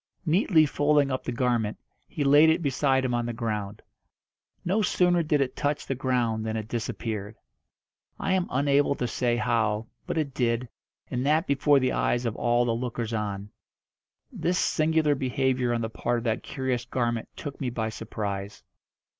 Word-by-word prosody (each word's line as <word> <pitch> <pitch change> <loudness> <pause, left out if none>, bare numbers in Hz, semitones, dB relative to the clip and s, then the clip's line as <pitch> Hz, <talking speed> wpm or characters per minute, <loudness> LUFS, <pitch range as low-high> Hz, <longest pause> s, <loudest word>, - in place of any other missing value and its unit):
Neatly 165 -1 +4
folding 145 -1 +2
up 130 - -2
the - - -3
garment, 120 -3 0 0.3
he 150 - -3
laid 145 +3 +6
it 160 +2 +2
beside 135 -1 +2
him 125 - -1
on 120 0 0
the 120 - -3
ground. 110 -3 -4 0.8
No 195 +5 +2
sooner 180 -3 +3
did 150 -2 +1
it 130 -2 -1
touch 145 0 -1
the - - -1
ground 120 -4 0
than 110 0 -2
it 110 -1 -5
disappeared. 110 -2 -4 0.8
I 190 - 0
am 185 -1 +1
unable 140 +1 +2
to 125 - -2
say 120 +1 0
how, 115 -3 0 0.2
but - - -2
it 145 -4 -1
did, 120 -1 0 0.4
and 125 0 -1
that 155 +3 +3
before 140 +1 +3
the 130 -1 +1
eyes 120 0 0
of 115 -1 -1
all 120 0 +2
the 120 - +1
lookers 115 -1 -3
on. 105 -2 -3 0.8
This 180 +1 -1
singular 155 -3 +2
behaviour 130 -2 0
on 120 -1 0
the 110 - -2
part 120 +2 -1
of 115 - -4
that 115 -2 0
curious 130 -3 -2
garment 120 -2 -2
took 145 -1 -7
me 130 - 0
by 110 -2 -2
surprise. 100 -2 -5
125 Hz, 175 wpm, -27 LUFS, 115-145 Hz, 0.8 s, laid